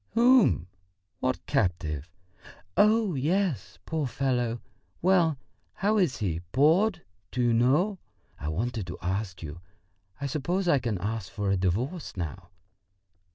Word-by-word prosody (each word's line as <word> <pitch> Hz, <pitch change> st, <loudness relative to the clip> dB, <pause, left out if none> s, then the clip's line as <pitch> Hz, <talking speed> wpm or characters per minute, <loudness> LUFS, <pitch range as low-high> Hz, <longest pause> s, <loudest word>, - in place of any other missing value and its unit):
"Whom?... 240 Hz, -, +5 dB, 0.5 s
What 130 Hz, 0 st, -1 dB
captive?... 85 Hz, -, -1 dB, 0.7 s
Oh, 215 Hz, -2 st, +4 dB
yes! 145 Hz, -, 0 dB
Poor 160 Hz, -4 st, -1 dB
fellow! 125 Hz, -3 st, 0 dB, 0.4 s
Well, 170 Hz, -5 st, +3 dB, 0.4 s
how 210 Hz, +2 st, +1 dB
is 175 Hz, -8 st, +2 dB
he 85 Hz, -6 st, -2 dB
bored? 165 Hz, -, +3 dB, 0.3 s
Do 125 Hz, -, -5 dB
you 120 Hz, -1 st, +3 dB
know... 150 Hz, -, +3 dB, 0.4 s
I 75 Hz, -, -5 dB
wanted 105 Hz, +5 st, -2 dB
to 90 Hz, -, -6 dB
ask 95 Hz, 0 st, -2 dB
you.... 80 Hz, +2 st, -7 dB, 0.6 s
I 140 Hz, -, -3 dB
suppose 170 Hz, +7 st, -1 dB
I 145 Hz, -5 st, +4 dB
can 115 Hz, -4 st, -2 dB
ask 105 Hz, +1 st, -3 dB
for 100 Hz, -1 st, -1 dB
a -, -, +3 dB
divorce 105 Hz, -, -2 dB
now?" 85 Hz, +1 st, -5 dB
125 Hz, 130 wpm, -28 LUFS, -, 0.7 s, Whom